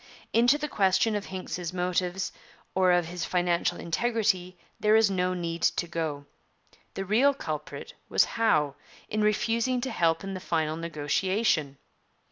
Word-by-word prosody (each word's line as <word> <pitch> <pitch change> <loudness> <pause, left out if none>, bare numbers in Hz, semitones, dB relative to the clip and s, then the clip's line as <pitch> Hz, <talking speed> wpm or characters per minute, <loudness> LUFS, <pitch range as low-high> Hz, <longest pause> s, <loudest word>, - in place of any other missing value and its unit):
Into 245 +5 +5
the 300 0 -3
question 210 -2 +2
of 205 - -3
Hincks's 180 -2 -5
motives 180 +1 -1 0.4
or 185 -1 +4
of 175 -1 +3
his 175 0 -5
financial 175 -1 0
integrity 185 -2 0 0.2
there 215 +1 +4
is 220 -2 +5
no 185 -1 0
need 170 -1 -4
to 175 - +1
go. 160 -4 -3 0.7
The 195 - -3
real 255 +8 +3
culprit 155 - -6 0.2
was - - +4
Howe, 150 -11 +1 0.4
in 215 - -1
refusing 230 +4 +1
to 260 +1 -3
help 165 -5 +1
in 195 0 -5
the 185 - -4
final 160 -3 -1
negotiation. 160 0 0
185 Hz, 145 wpm, -28 LUFS, 170-215 Hz, 0.7 s, Into